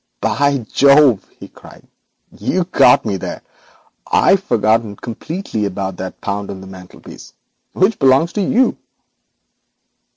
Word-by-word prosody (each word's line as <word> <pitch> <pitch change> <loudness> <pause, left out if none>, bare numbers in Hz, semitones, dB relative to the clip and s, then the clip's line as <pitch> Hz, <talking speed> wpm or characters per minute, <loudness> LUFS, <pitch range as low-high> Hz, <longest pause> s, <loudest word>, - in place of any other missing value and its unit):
'By 140 -4 0
Jove,' 140 -5 +4
he - - -11
cried, - - -17 0.5
'you've 180 0 -2
got 125 - +4
me 100 -3 -2
there. - - -7 0.6
I'd 195 - +3
forgotten 110 - 0
entirely 120 - -4
about 95 -1 -5
that 95 0 -7
pound 100 0 -4
on 95 - -7
the 95 - -11
mantelpiece, 95 -1 -13 0.4
which 190 +5 +1
belongs 135 +6 +3
to 210 - -1
you.' 255 +5 +1
120 Hz, 125 wpm, -17 LUFS, 100-165 Hz, 0.6 s, Jove